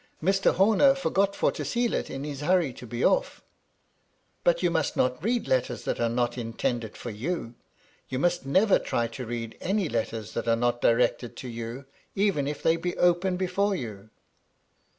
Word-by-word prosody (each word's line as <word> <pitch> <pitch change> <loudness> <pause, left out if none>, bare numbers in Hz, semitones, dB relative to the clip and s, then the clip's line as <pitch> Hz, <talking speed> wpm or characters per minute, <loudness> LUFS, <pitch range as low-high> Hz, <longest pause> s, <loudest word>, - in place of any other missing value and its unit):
Mr. 195 +4 +2
Horner 220 +8 +5
forgot 200 -7 +1
for - - +2
to - - -5
seal 240 -1 0
it, - - -2
in 135 +1 -5
his 145 -1 -5
hurry 165 -3 +2
to 120 - -11
be 120 +2 -4
oflF." - - +2 1.0
"But - - +2
you 175 - +3
must 160 -4 0
not 125 +5 +1
read 235 +3 0
letters 125 -2 0
that - - -2
are 115 - +1
not 120 +1 -1
in 115 -1 -5
tended 115 -2 -2
for 120 - -6
you. 120 +3 -4 0.6
You 130 - -2
must 175 +3 +1
never 190 +10 +4
try 120 - -1
to 125 +1 -7
read 115 -1 -5
any 195 -1 0
letters 115 -3 -3
that - - -3
are 115 - +4
not 120 +1 0
directed 120 0 +2
to 130 - -7
you, 115 +3 -6 0.3
even 195 -9 +1
if 145 - -4
they 165 +1 +3
be 175 +1 -3
open 180 +1 +2
before 195 +2 0
you." 110 - -7
140 Hz, 190 wpm, -27 LUFS, 120-185 Hz, 1.0 s, Horner